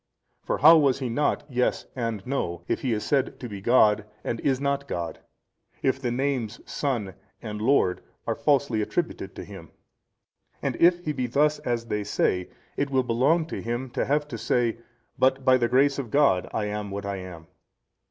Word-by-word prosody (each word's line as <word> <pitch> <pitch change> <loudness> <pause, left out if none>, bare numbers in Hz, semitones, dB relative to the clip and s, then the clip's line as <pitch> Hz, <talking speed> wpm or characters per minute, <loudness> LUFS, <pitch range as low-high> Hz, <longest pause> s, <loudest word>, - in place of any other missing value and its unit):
For - - -2
how 160 +4 +8
was 140 -3 +3
He 130 -3 -3
not 145 +6 0
Yes 125 -3 0
and 115 -5 -3
No, 85 -11 -2
if - - -1
He 130 - -1
is 105 -2 -1
said 135 -2 0
to 125 - -6
be 100 -3 -7
God 105 -2 +4 0.2
and 115 - -3
is 135 -2 +1
not 140 0 -1
God? 85 -7 -4 0.6
if 130 0 +1
the 125 - -1
names 125 -3 -1
SON 120 -10 -2 0.3
and 105 -1 -6
LORD 110 -7 +2 0.2
are - - 0
falsely 140 -6 +1
attributed 105 - -3
to - - -7
Him? - - -11 0.9
and - - -2
if 175 +1 +4
He 155 - 0
be 130 -3 -2
thus 150 +5 +2
as 120 -1 -2
they 105 -2 -2
say, 90 -3 0 0.3
it 140 - 0
will 130 -1 +2
belong 135 +8 +2
to - - -4
Him 120 +2 -3
to - - -1
have 145 +2 +1
to - - -6
say, 120 -2 0 0.4
But 130 0 +2
by 130 0 +6
the 120 -2 +1
grace 140 +2 +3
of 125 -5 -4
God 125 -8 +3
I 105 - -1
am 105 0 -4
what 100 0 -5
I 100 -1 -3
am. 90 -3 -9
125 Hz, 190 wpm, -26 LUFS, 105-140 Hz, 0.9 s, how